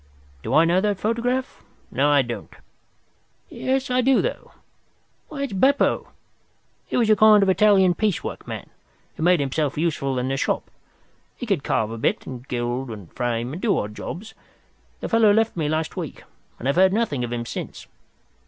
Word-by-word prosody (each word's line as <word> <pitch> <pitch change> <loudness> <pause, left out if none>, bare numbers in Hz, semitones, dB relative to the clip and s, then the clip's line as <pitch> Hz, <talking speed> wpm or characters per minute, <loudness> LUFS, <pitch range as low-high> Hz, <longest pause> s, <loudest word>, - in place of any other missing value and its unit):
Do - - -2
I 160 - +6
know 175 +3 +3
that 205 -2 0
photograph? 245 +4 -1 0.3
No, 140 +4 +2
I 145 -2 +4
don't. 120 -1 -6 1.0
Yes, 265 0 -2
I 250 0 +3
do, 265 +1 +4
though. - - -3 0.8
Why, 280 -3 -4
it's 275 - -4
Beppo. 265 +9 +2 0.8
He - - -2
was 235 -3 +3
a - - +6
kind 210 0 +6
of 195 - +2
Italian 190 -2 +5
piece 210 0 -1
work - - -7
man, - - -7 0.4
who - - -8
made 175 +1 +4
himself 140 +1 -1
useful 145 -5 -1
in 125 +1 -1
the 135 +1 -1
shop. - - -2 0.7
He 245 - -5
could 195 - 0
carve 110 0 0
a 115 - -6
bit, - - 0
and 130 0 -8
gild 120 +1 -2
and 105 -6 -9
frame, 120 +1 -2
and 175 - -6
do 220 -4 +2
odd 105 +1 -3
jobs. 210 - -7 0.7
The - - -3
fellow 225 -2 +5
left 225 +2 +2
me 155 -4 -1
last 155 +1 -2
week, - - -6 0.3
and 125 - -5
I've 140 - +1
heard 190 +1 +5
nothing 210 - 0
of 120 - -4
him 120 -1 -3
since. - - -7
175 Hz, 185 wpm, -23 LUFS, 130-215 Hz, 1.0 s, I